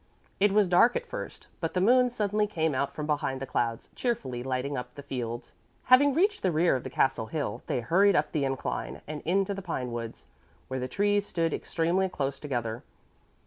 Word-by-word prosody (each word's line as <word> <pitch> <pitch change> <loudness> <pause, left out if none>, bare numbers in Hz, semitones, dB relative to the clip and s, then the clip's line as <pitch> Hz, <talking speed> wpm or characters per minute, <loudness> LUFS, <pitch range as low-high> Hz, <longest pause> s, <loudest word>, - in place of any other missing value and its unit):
It 205 +1 +4
was 205 -1 +4
dark 180 +7 +5
at 485 - -2
first, - - -7
but 165 +1 -3
the - - +3
moon 250 +6 +5
suddenly 210 -3 0
came 160 -6 0
out 135 +1 -1
from 150 - -3
behind 145 -3 -1
the 135 - -4
clouds, 115 -3 -1
cheerfully 135 - -2
lighting 130 +2 -2
up 125 -1 -6
the 145 - -9
fields. 120 -4 -5 0.3
Having 270 +2 +6
reached 400 +5 +2
the 185 - +2
rear 165 -1 +3
of 130 - -3
the - - -5
castle 130 -4 +1
hill, 135 -7 -3
they 125 - 0
hurried 195 - +4
up 150 0 +1
the 150 - 0
incline 135 -1 -3
and 150 0 -6
into 195 +4 +1
the 195 - -5
pinewoods, 120 -10 -5 0.4
where 130 0 -2
the 125 - -2
trees 205 +7 +1
stood 165 -2 0
extremely 175 +3 0
close 140 -5 -3
together. 120 -5 -3
155 Hz, 195 wpm, -28 LUFS, 130-200 Hz, 0.4 s, Having